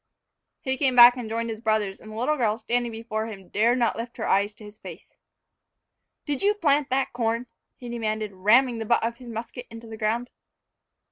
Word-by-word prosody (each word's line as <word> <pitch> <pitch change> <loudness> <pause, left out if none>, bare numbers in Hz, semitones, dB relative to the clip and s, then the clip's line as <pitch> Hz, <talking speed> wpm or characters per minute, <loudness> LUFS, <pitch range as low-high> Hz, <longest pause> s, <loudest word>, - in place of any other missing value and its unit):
He 265 0 -2
came 260 -1 +1
back 240 0 +9
and 240 -3 -6
joined 230 +1 -2
his 220 0 -7
brothers; 215 -4 0
and 215 - -11
the - - -9
little 250 +7 0
girl, 220 -6 0
standing 240 +1 -1
before 220 -1 -4
him, 195 -5 -10
dared 235 +4 +2
not 235 -2 +1
lift 230 +1 -7
her 220 - -3
eyes 200 +2 +2
to 215 - -14
his 210 +1 -13
face. - - -11 1.1
"Did 290 -3 -2
you 415 +1 +3
plant 295 -7 +2
that 265 +1 0
corn?" 230 0 -1 0.3
he 245 - -10
demanded, 215 -3 -3
ramming 230 +6 +3
the 225 - -4
butt 235 - +2
of 235 +1 -2
his 245 -1 -11
musket 230 +2 -7
into 230 0 -10
the 220 -1 -9
ground. 230 +3 -1
230 Hz, 205 wpm, -25 LUFS, 220-245 Hz, 1.1 s, back